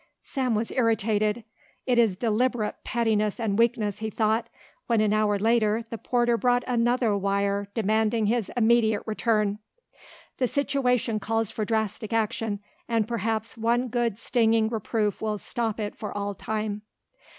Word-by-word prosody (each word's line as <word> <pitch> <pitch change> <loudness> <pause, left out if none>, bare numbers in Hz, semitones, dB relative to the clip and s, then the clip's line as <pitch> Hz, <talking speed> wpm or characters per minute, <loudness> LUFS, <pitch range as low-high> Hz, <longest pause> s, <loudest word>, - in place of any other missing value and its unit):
Sam 255 -4 -1
was 220 +2 -1
irritated. 220 -2 +1 0.4
"It 245 -2 +2
is 215 -6 +3
deliberate 230 0 0
pettiness 220 -3 0
and 220 -2 0
weakness," 225 -4 +1
he 220 0 -3
thought, 220 +2 0 0.4
when 230 -2 +2
an 215 -1 +2
hour 215 -1 +2
later 225 +1 +2
the 230 - -5
porter 240 -1 +1
brought 245 0 +2
another 240 -2 +2
wire 200 0 0
demanding 220 +1 +1
his 225 0 0
immediate 225 -2 +3
return. 215 -2 0 0.8
"The 255 - +2
situation 250 -5 0
calls 225 0 -1
for 215 - -2
drastic 220 0 -2
action 220 -2 -1 0.3
and 225 -2 +1
perhaps 225 -1 -2
one 240 +3 +1
good 235 -3 0
stinging 225 -2 +2
reproof 220 -2 -1
will 215 -1 -1
stop 225 +1 -3
it 210 -1 -3
for 210 - -6
all 205 0 -3
time." 210 0 -3
220 Hz, 145 wpm, -26 LUFS, 210-235 Hz, 0.8 s, is